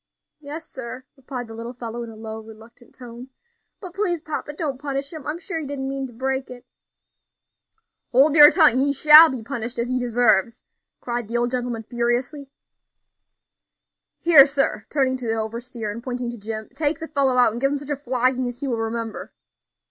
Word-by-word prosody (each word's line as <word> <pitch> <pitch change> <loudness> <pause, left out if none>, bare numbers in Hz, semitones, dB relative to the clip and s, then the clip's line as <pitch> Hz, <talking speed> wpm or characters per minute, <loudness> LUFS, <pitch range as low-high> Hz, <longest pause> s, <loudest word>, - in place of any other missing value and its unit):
"Yes, 310 +2 -8
sir," 255 +1 -8
replied 255 -2 -7
the 225 - -10
little 230 +2 -7
fellow, 235 0 -6
in 235 - -7
a 225 - -11
low, 220 0 -7
reluctant 225 +2 -15
tone; 245 +1 -11 0.5
"but 365 -4 -10
please, 370 -3 -1
papa, 305 -1 -5
don't 285 -4 -4
punish 280 0 -4
him. 310 -3 -9
I'm 305 +2 -3
sure 345 -2 -5
he 300 - -6
didn't 270 -1 -4
mean 270 0 -4
to 245 - -15
break 265 +2 -3
it." 250 0 -11 1.5
"Hold 280 +4 +4
your 295 -1 +10
tongue! 305 -8 +4
he 280 +1 +2
shall 305 +3 +9
be 255 -5 -5
punished 240 0 -5
as 235 +1 -2
he 255 - 0
deserves," 230 -2 +1 0.4
cried 240 -2 -4
the 235 +2 -2
old 240 0 0
gentleman, 245 -3 -3
furiously. 245 +5 -2 1.7
"Here, 310 -5 +7
sir," 275 -7 -1
turning 265 -3 0
to 250 -2 -6
the 225 - 0
overseer, 225 0 -4
and 230 +3 -7
pointing 245 -1 -4
to 240 - -9
Jim, 215 +1 -6
"take 305 0 0
the 320 - -6
fellow 275 -4 +1
out, 245 -3 +5
and 235 +3 -6
give 275 0 +2
him 285 - -1
such 285 +1 -7
a - - +1
flogging 255 -1 0
as 245 0 -7
he 280 - -3
will 235 -3 -2
remember." 225 0 -5
255 Hz, 195 wpm, -22 LUFS, 235-280 Hz, 1.7 s, your